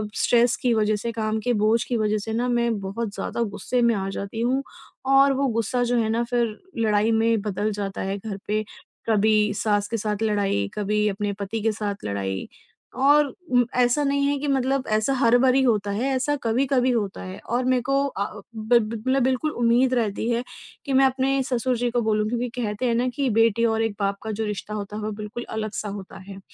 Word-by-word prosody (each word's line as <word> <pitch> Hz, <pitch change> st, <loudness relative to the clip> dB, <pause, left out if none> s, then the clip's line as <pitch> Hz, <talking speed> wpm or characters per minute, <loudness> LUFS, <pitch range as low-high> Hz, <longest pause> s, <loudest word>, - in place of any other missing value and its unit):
Stress 240 Hz, 0 st, +3 dB
की 245 Hz, -2 st, +2 dB
वज़ह 215 Hz, -1 st, +2 dB
से, 230 Hz, +3 st, -3 dB
काम 220 Hz, -1 st, -1 dB
के 245 Hz, +3 st, 0 dB
बोझ 220 Hz, +2 st, +2 dB
की 245 Hz, -, -2 dB
वज़ह 215 Hz, -1 st, +1 dB
से 220 Hz, +2 st, -4 dB
ना 240 Hz, +2 st, 0 dB
मैं 235 Hz, -3 st, +1 dB
बहुत 200 Hz, +2 st, -4 dB
ज़्यादा -, -, -3 dB
गुस्से 245 Hz, +4 st, -1 dB
में 235 Hz, 0 st, +4 dB
आ 195 Hz, -1 st, -2 dB
जाती 200 Hz, +3 st, -5 dB
हूँ 260 Hz, +3 st, +1 dB, 0.5 s
और 275 Hz, 0 st, +6 dB
वो 275 Hz, +1 st, +1 dB
गुस्सा 230 Hz, +1 st, 0 dB
जो 245 Hz, 0 st, +1 dB
है 220 Hz, -1 st, 0 dB
ना 230 Hz, +2 st, +1 dB
फ़िर 235 Hz, -2 st, -1 dB, 0.2 s
लड़ाई 215 Hz, -1 st, +2 dB
में 225 Hz, -1 st, +2 dB
बदल 210 Hz, +1 st, -2 dB
जाता 200 Hz, -1 st, -4 dB
है। 195 Hz, +1 st, -2 dB
घर 205 Hz, 0 st, -6 dB
पे 215 Hz, +1 st, 0 dB, 0.5 s
कभी 215 Hz, 0 st, +3 dB
सास 205 Hz, 0 st, 0 dB
के 230 Hz, -, -2 dB
साथ 210 Hz, 0 st, -2 dB
लड़ाई, 200 Hz, -, +1 dB
कभी 210 Hz, 0 st, 0 dB
अपने 205 Hz, 0 st, -2 dB
पति 205 Hz, +2 st, -4 dB
के 225 Hz, +1 st, +2 dB
साथ 205 Hz, -2 st, -4 dB
लड़ाई 95 Hz, -2 st, -3 dB, 0.6 s
और 295 Hz, +2 st, +6 dB, 0.2 s
उम, 245 Hz, -1 st, +4 dB
ऐसा 250 Hz, +4 st, +3 dB
नहीं 280 Hz, 0 st, +1 dB
है 285 Hz, 0 st, +1 dB
कि 295 Hz, -, -3 dB
मतलब 270 Hz, -1 st, 0 dB
ऐसा 220 Hz, +6 st, 0 dB
हर 240 Hz, -1 st, +4 dB
बारी 260 Hz, +1 st, +4 dB
होता 210 Hz, -5 st, +1 dB
है, 230 Hz, +7 st, -1 dB
ऐसा 270 Hz, +3 st, 0 dB
कभी-कभी 255 Hz, +2 st, +2 dB
होता 210 Hz, -5 st, -2 dB
है। 185 Hz, 0 st, -8 dB
और 240 Hz, +3 st, +1 dB
मेरे 255 Hz, -1 st, +2 dB
को 275 Hz, -, -1 dB
अ, 210 Hz, -4 st, -5 dB
बि 220 Hz, +2 st, +3 dB
ब 220 Hz, 0 st, -4 dB
मतलब 260 Hz, +4 st, +1 dB
बिल्कुल 260 Hz, +4 st, +1 dB
उम्मीद 240 Hz, +1 st, +2 dB
रहती 225 Hz, -2 st, 0 dB
है 235 Hz, 0 st, 0 dB, 0.4 s
कि 275 Hz, -, -2 dB
मैं 270 Hz, +1 st, +5 dB
अपने 265 Hz, +1 st, +1 dB
ससुर 250 Hz, -1 st, 0 dB
जी 245 Hz, +1 st, 0 dB
को 240 Hz, 0 st, +1 dB
बोलूँ 215 Hz, -1 st, +1 dB
क्योंकि 240 Hz, +1 st, -2 dB
कहते 210 Hz, +2 st, -2 dB
हैं 235 Hz, -2 st, +2 dB
ना 245 Hz, +2 st, +1 dB
कि 275 Hz, -2 st, 0 dB
बेटी 230 Hz, 0 st, +3 dB
और 225 Hz, -1 st, +1 dB
एक 225 Hz, -2 st, -2 dB
बाप 200 Hz, 0 st, 0 dB
का 220 Hz, -, -3 dB
जो 220 Hz, +1 st, -2 dB
रिश्ता 210 Hz, 0 st, -5 dB
होता 210 Hz, 0 st, -5 dB
है 215 Hz, -, -4 dB
वो 215 Hz, -, -2 dB
बिल्कुल 215 Hz, +3 st, -6 dB
अलग-सा 215 Hz, -1 st, -4 dB
होता 200 Hz, -1 st, -8 dB
है। 195 Hz, -1 st, -8 dB
225 Hz, 220 wpm, -24 LUFS, 210-245 Hz, 0.6 s, और